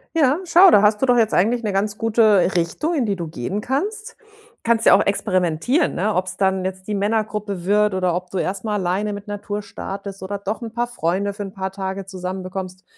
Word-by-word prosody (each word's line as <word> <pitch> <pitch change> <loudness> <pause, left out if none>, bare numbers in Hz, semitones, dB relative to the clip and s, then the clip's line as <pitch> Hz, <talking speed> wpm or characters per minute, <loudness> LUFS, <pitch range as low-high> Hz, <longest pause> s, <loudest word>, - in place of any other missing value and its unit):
Ja, 290 -3 +3
schau, 355 +2 +7
da 205 - +6
hast 210 0 +3
du 265 - +2
doch 245 -1 +4
jetzt 225 -2 +2
eigentlich 230 +6 +2
'ne 210 -2 -1
ganz 205 +2 -1
gute 215 -4 +3
Richtung, 175 - 0
in 270 -8 0
die 200 - 0
du 170 -3 -5
gehen 155 - -4
kannst. 415 - -3 0.5
Kannst 230 -1 +2
ja - - +8
auch - - +3
experimentieren, 190 - +1
ne? 210 +4 0
Ob's 185 0 -2
dann 190 -1 +1
jetzt 190 0 -5
die 210 - -2
Männergruppe 205 -2 -2
wird 210 0 +2
oder 185 -2 +1
ob 180 0 -4
du 190 - -4
erst 190 +1 -2
mal 215 -2 -1
alleine 195 +2 -1
mit 205 0 -8
Natur 205 0 -4
startest 195 -1 -7
oder 195 +2 -4
doch 200 +3 -4
'n 230 -1 -6
paar 240 +2 -1
Freunde 200 -3 -1
für 205 - -8
'n 195 - -7
paar 190 -2 -4
Tage 190 0 -5
zusammen 185 0 -5
bekommst 185 0 -6
200 Hz, 220 wpm, -21 LUFS, 190-220 Hz, 0.5 s, ja